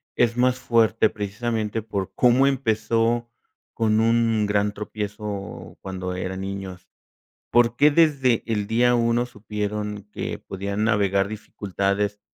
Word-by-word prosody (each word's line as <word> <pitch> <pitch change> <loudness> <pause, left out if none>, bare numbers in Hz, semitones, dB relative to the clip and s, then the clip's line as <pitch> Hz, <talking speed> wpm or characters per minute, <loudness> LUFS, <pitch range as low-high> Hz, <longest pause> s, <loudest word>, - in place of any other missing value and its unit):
es 120 0 +2
más 125 0 +3
fuerte 115 -4 +3
precisamente 110 +1 -3
por 100 -3 -4
cómo 125 +2 +4
empezó, 115 -2 +1 0.4
con 110 -1 +2
un 115 -1 +2
gran 105 0 +1
tropiezo 105 -4 -6
cuando 95 -1 -5
eran 95 +1 -4
niños? 95 -2 -6 0.6
¿Por 120 0 +3
qué 145 +1 +6
desde 145 -6 +3
el 105 -3 -1
día 120 +2 +3
1 120 0 +2
supieron 105 -2 -4
que - - -4
podían 100 +2 -4
navegar 100 -3 +2
dificultades 100 -1 -2
110 Hz, 120 wpm, -24 LUFS, 100-115 Hz, 0.6 s, qué